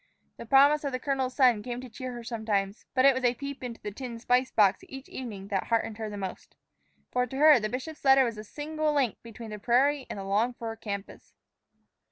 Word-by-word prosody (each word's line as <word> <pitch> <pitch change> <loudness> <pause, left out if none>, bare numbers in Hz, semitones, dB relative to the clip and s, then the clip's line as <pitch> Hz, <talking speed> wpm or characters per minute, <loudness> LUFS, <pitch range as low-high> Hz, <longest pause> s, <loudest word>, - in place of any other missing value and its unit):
The - - -9
promise 285 +4 +5
of 280 -2 -3
the 255 - -1
colonel's 265 -1 -1
son 250 -6 +4
came 240 +2 -5
to 255 - -8
cheer 255 +2 -7
her 240 -1 -7
sometimes; 220 -3 -2
but 255 0 +4
it 275 - +7
was 260 0 -3
a 245 0 +3
peep 280 +1 -7
into 235 -2 -6
the 210 - -6
tin 240 +2 -7
spice 250 +2 +1
box 200 -3 +3
each 270 0 -9
evening 205 -6 -7
that 195 -2 -1
heartened 225 -1 -1
her 220 -1 -3
most. 190 -2 -7 0.6
For 250 0 +1
to 265 - -7
her 300 -2 +7
the 215 -1 -2
bishop's 280 +6 -6
letter 270 -1 +6
was 230 -2 -3
the 215 - -7
single 305 +5 -2
link 260 -7 +1
between 230 -1 -10
the 210 - -6
prairie 265 +5 +2
and - - -5
the 195 - -5
longed 215 +5 0
for 225 -1 -5
campus. 200 -2 -7
245 Hz, 225 wpm, -28 LUFS, 220-270 Hz, 0.6 s, it